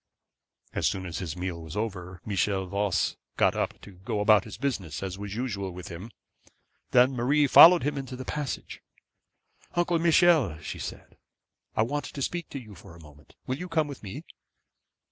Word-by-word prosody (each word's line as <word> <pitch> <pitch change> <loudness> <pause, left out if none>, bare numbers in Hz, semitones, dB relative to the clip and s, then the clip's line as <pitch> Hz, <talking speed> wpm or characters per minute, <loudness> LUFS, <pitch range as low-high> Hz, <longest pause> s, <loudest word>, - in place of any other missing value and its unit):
As - - +1
soon 95 -1 -2
as 85 -3 -4
his 85 -2 -5
meal 90 -2 -4
was 80 +4 -8
over, 95 -5 -4
Michel 100 -1 0
Voss 100 0 0 0.2
got - - +3
up - - -2
to 100 - -12
go 100 +5 -5
out - - 0
about 105 -2 +6
his - - -9
business, 110 - -3
as 95 0 -5
was 105 0 -5
usual 105 -6 -3
with 90 0 -8
him. 90 +5 -8 0.8
Then 125 +1 +5
Marie 135 +4 +2
followed 170 +5 +9
him 145 0 -1
into 130 -1 -6
the 130 0 -7
passage. 150 -1 -4 0.9
'Uncle 175 -1 +2
Michel,' 165 - +4
she 80 - -7
said, - - -8 0.6
'I 110 - +3
want 145 +4 -2
to 140 - -7
speak 175 +2 -3
to 140 - -5
you 110 -5 -12
for 85 -2 -14
a - - -14
moment; 75 0 -18
will 130 - -2
you 180 - -6
come 160 -2 +1
with 140 -2 -8
me?' 100 -3 -7
105 Hz, 185 wpm, -27 LUFS, 95-140 Hz, 0.9 s, followed